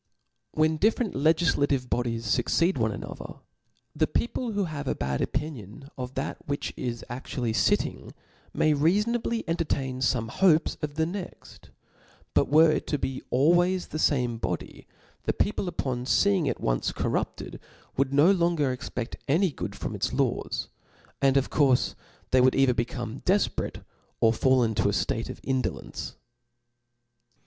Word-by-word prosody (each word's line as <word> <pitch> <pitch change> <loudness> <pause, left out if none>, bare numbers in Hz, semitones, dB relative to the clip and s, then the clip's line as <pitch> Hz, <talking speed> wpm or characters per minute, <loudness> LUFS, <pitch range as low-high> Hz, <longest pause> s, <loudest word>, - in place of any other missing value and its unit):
When 155 0 +2
different 215 +3 +1
legiflative 145 -3 +2
bodies 120 -2 -1
fucceed 170 - +2
one 110 -1 +1
another, 100 - -7 0.6
the 155 +1 +2
people 235 -1 -2
who 205 0 +1
have 150 -5 -5
a - - 0
bad 65 0 -2
opinion 135 -3 -4
of 130 +1 -6
that 135 - -3
which 145 0 -3
is 120 -2 -4
aftually 120 -1 -3
fitting, - - 0 0.4
may 155 - +2
reafonably 210 +10 +1
entertain 140 -6 -1
fome 125 -3 +1
hopes 165 -2 +3
of 150 -2 -4
the 160 +1 +1
next: 180 +2 -8 0.6
but - - +2
were 155 +2 +6
it - - -2
to 150 - 0
be 130 -1 -3
always 175 +7 +3
the 155 - -4
fame 125 -7 +1
body, - - -5 0.4
the - - +1
people 200 -2 -1
upon 125 -7 -2
feeing 190 +2 +3
it - - -1
once - - 0
corrupted, - - -3 0.4
would 135 0 +1
no 145 +7 +5
longer 170 -7 +2
ex 125 - -6
pert 120 0 -5
any 170 +5 +3
good - - -6
from - - -5
its - - -1
laws; - - -1 0.5
and 135 0 +4
of 135 - 0
courfe 135 -4 +3 0.4
they 130 - +5
would 130 0 +4
either 135 -2 +4
become 120 0 -3
deiperate 195 +2 0 0.4
or 115 0 +4
fall 130 +1 +3
into 110 -2 0
a - - -1
ftate 115 +2 -1
pf - - -7
indolence. 130 -1 -3
140 Hz, 150 wpm, -27 LUFS, 125-165 Hz, 0.6 s, were